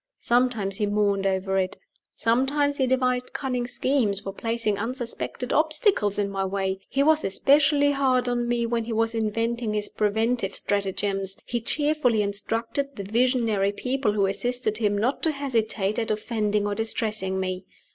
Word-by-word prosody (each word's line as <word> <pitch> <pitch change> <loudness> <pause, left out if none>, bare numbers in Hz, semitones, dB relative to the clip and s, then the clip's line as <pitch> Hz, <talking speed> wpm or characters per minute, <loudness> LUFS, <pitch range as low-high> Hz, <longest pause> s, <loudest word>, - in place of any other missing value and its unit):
Sometimes 235 -5 +1
he 210 - 0
mourned 200 -1 +1
over 190 0 0
it. 190 +2 -2 0.4
Sometimes 280 +5 +1
he 265 - +2
devised 255 -1 0
cunning 250 -3 -2
schemes 245 -5 0
for 195 -1 -6
placing 225 -1 -1
unsuspected 245 +1 -4
obstacles 310 - +2
in 205 -1 +1
my 195 0 -1
way. 190 0 -2
He 275 +1 +2
was 315 +1 +4
especially 285 +7 +3
hard 260 -3 +2
on 240 -1 0
me 240 -1 0
when 230 -1 -1
he 230 - -3
was 225 +1 +1
inventing 230 0 -1
his 210 0 -1
preventive 220 0 0
stratagems 195 -1 -1
he 240 -1 -2
cheerfully 290 -4 +2
instructed 230 +7 -3
the 200 - -5
visionary 225 -2 +1
people 250 -1 -1
who 200 -2 +2
assisted 220 +2 -1
him 205 -2 +1
not 240 +7 0
to 320 - +3
hesitate 225 -7 -1
at 225 - -2
offending 210 -1 0
or 205 - -1
distressing 215 -3 -1
me. 185 0 -3
225 Hz, 155 wpm, -25 LUFS, 205-255 Hz, 0.4 s, was